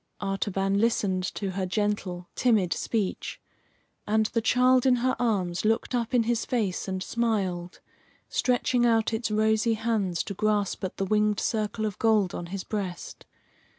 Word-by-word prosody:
Artaban 195 0 -1
listened 200 -5 +1
to 195 -2 -3
her 185 0 -2
gentle, 190 -3 -2
timid 215 -8 +2
speech, 210 -5 -2 0.7
and 220 +1 +2
the 230 - +2
child 250 +2 +4
in 255 - +5
her 255 +1 +1
arms 190 -7 0
looked 225 +4 +1
up 240 0 0
in 240 - +4
his 230 0 0
face 215 -9 -1
and 190 -1 -3
smiled, 190 -7 -2 0.5
stretching 250 -1 +1
out 225 -1 +2
its 225 +1 -1
rosy 220 +1 +2
hands 215 -6 -1
to 200 - -5
grasp 205 -1 0
at 185 - -4
the 195 - -1
winged 210 +1 +2
circle 215 0 -1
of 210 -3 -4
gold 215 -5 +3
on 175 - -5
his 190 +1 -5
breast. 190 -5 -5
215 Hz, 155 wpm, -27 LUFS, 195-230 Hz, 0.7 s, in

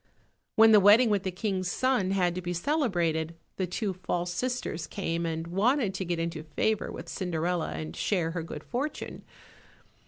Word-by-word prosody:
When 225 0 +7
the 215 - +8
wedding 215 +4 +6
with 205 -2 +2
the 190 - -2
King's 185 -1 -2
son 255 -4 +1
had 185 -3 +2
to 185 - -4
be 175 0 -3
celebrated, 170 - 0 0.2
the 185 - -1
two 195 +2 -2
false 175 -1 -2
sisters 245 -9 -2
came 165 +1 -2
and 165 0 -3
wanted 205 +5 +1
to 190 0 -3
get 175 0 -1
into 165 -1 -3
favour 165 +8 -1
with - - -8
Cinderella 175 - -2
and 80 0 -5
share 175 -5 0
her 170 0 -3
good 155 -2 -7
fortune. 275 +5 -4
180 Hz, 175 wpm, -28 LUFS, 165-210 Hz, 0.2 s, the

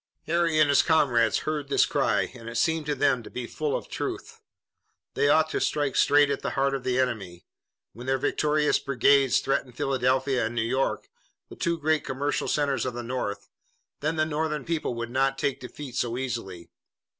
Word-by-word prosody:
Harry 165 -1 +1
and 155 - +6
his 140 - +5
comrades 125 -9 +3
heard 150 -2 -2
this - - +4
cry, - - +1
and 115 -2 -9
it 115 - -8
seemed 160 +5 +1
to 150 - 0
them 125 -3 +2
to - - -11
be 125 -1 -5
full 150 +4 -2
of - - -9
truth. - - -5 0.7
They 145 - +2
ought 155 +1 +3
to - - -1
strike 145 -3 0
straight 145 0 +4
at 140 - -2
the - - -2
heart 135 0 +2
of 135 -2 -3
the 130 0 0
enemy. 100 -9 -2 0.5
When 120 +4 -10
their 135 0 +2
victorious 150 +3 +1
brigades 140 0 +3
threatened 135 -2 -2
Philadelphia 130 -2 +1
and 115 - -7
New 115 - +1
York, 130 +4 -1 0.4
the - - -10
two 170 0 -1
great 155 -1 +1
commercial 140 +2 -2
centers 140 -4 0
of 125 - -4
the 120 - -4
North, 115 -4 -4 0.5
then 155 +3 -1
the 155 0 +2
Northern 150 -1 -2
people 160 -7 -2
would 120 0 -5
not 135 +1 +1
take 140 -2 -1
defeat 130 +1 -9
so 120 -1 -1
easily. 115 -9 -5
135 Hz, 190 wpm, -26 LUFS, 125-150 Hz, 0.7 s, and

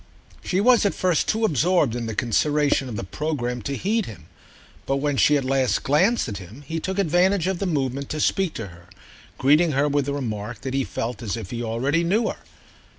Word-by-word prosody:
She 185 - 0
was 240 +3 +5
at 200 - +1
first 180 -4 +1
too 220 +1 +1
absorbed 155 - +2
in 120 -2 -3
the 110 - -4
consideration 140 +3 +1
of 115 - -5
the - - -4
programme 125 +1 -3
to 140 +6 -3
heed 220 +3 0
him, 90 -8 -10 0.6
but 135 - +1
when 145 +1 0
she 145 +2 +4
at 135 - -2
last 130 -1 +1
glanced 185 - +2
at 100 -3 -5
him 100 +10 -12
he 165 +2 -3
took 190 +4 -4
advantage 180 0 +2
of 190 -1 -1
the 195 - -1
movement 140 -4 -2
to 155 - -3
speak 185 +2 +1
to 110 -4 -5
her, 85 0 -16 0.5
greeting 150 +4 +4
her 140 +2 +2
with 145 -1 0
the 140 - -1
remark 115 -4 -4
that 130 -1 -4
he 135 0 +1
felt 115 -3 -4
as 115 -1 -3
if 110 -5 -7
he 120 - -4
already 130 +8 0
knew 215 +7 +1
her. - - -5
140 Hz, 215 wpm, -23 LUFS, 120-175 Hz, 0.6 s, was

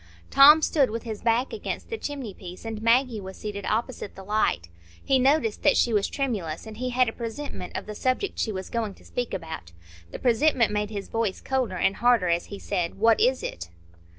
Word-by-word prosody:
Tom 300 +3 +8
stood 280 -5 +3
with 230 +2 -4
his 220 -3 -6
back 235 - +1
against 450 - -5
the - - -1
chimney 275 -8 -5
piece, 180 +3 -10
and 220 -1 -5
Maggie 230 -1 +2
was 190 0 -9
seated 200 -2 -5
opposite 225 -1 -2
the 195 - -10
light. 190 - 0 0.4
He 265 -1 +3
noticed 255 -4 +2
that 290 - +4
she 235 - +3
was 205 -2 +2
tremulous, 215 - -3
and 220 -1 -9
he 255 +1 -2
had 250 0 +3
a 225 - -2
presentiment 235 -4 -6
of - - -5
the 210 - -6
subject 255 - -1
she 220 - 0
was 190 -2 -6
going 220 -4 -2
to - - -20
speak 245 -1 -3
about. 85 - -6 0.4
The - - -7
presentiment 250 -1 +3
made 210 0 -1
his 200 -2 -5
voice 225 -4 -1
colder 255 -8 -1
and 195 +2 +1
harder 240 -6 +3
as 170 0 +1
he 200 - -8
said, 180 -4 -2
"What 225 +2 +4
is 255 +1 +2
it?" 85 0 -5
225 Hz, 210 wpm, -26 LUFS, 200-255 Hz, 0.4 s, Tom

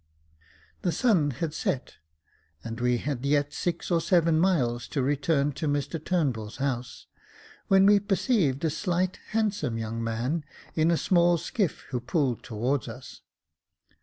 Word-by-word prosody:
The 175 - +1
sun 180 -9 +2
had 150 +4 -3
set, 130 - -3 0.7
and 115 0 -6
we 125 0 +2
had 135 0 -3
yet 145 0 +1
six 170 +2 -3
or 170 -1 +3
seven 165 -2 +3
miles 125 -10 +1
to 135 - -1
return 145 +1 +1
to 150 +3 -4
Mr 145 +2 -2
Turnbull's 130 - -1
house, 130 -3 -3 0.6
when 195 0 +5
we 205 0 +6
perceived 195 - +1
a 160 - +1
slight, 185 +2 -1
handsome 210 - -1
young 115 +1 -3
man, 120 +8 -1 0.3
in 160 +1 +2
a 170 - +3
small 175 -1 +3
skiff, 190 0 -2
who 125 - -2
pulled 130 -1 0
towards 120 +3 -2
us. - - -10
145 Hz, 145 wpm, -27 LUFS, 125-175 Hz, 0.7 s, we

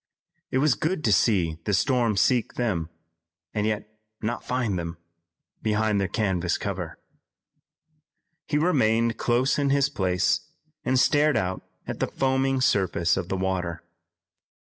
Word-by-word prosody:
It - - 0
was 145 0 +4
good 160 +4 -2
to 105 - +3
see 90 -6 +2
the 105 - +2
storm 120 -1 +2
seek 120 +5 +2
them, 95 -10 -1 0.6
and 105 0 0
yet 105 -1 -2 0.3
not 115 +2 -3
find 120 -7 -1
them 85 0 -5 0.6
behind 105 -1 +1
their 95 - 0
canvas 95 -5 0
cover. - - -4 1.5
He 150 - +1
remained 115 -8 +2
close 125 +4 +2
in 140 -1 +1
his 140 0 +3
place 90 -9 0 0.3
and 130 0 +2
stared 145 0 +3
out 95 -3 -1 0.2
at - - -5
the - - +1
foaming 135 0 +1
surface 95 -7 +2
of 95 -1 -3
the 95 - -1
water. 90 -2 -2
110 Hz, 140 wpm, -25 LUFS, 95-130 Hz, 1.5 s, was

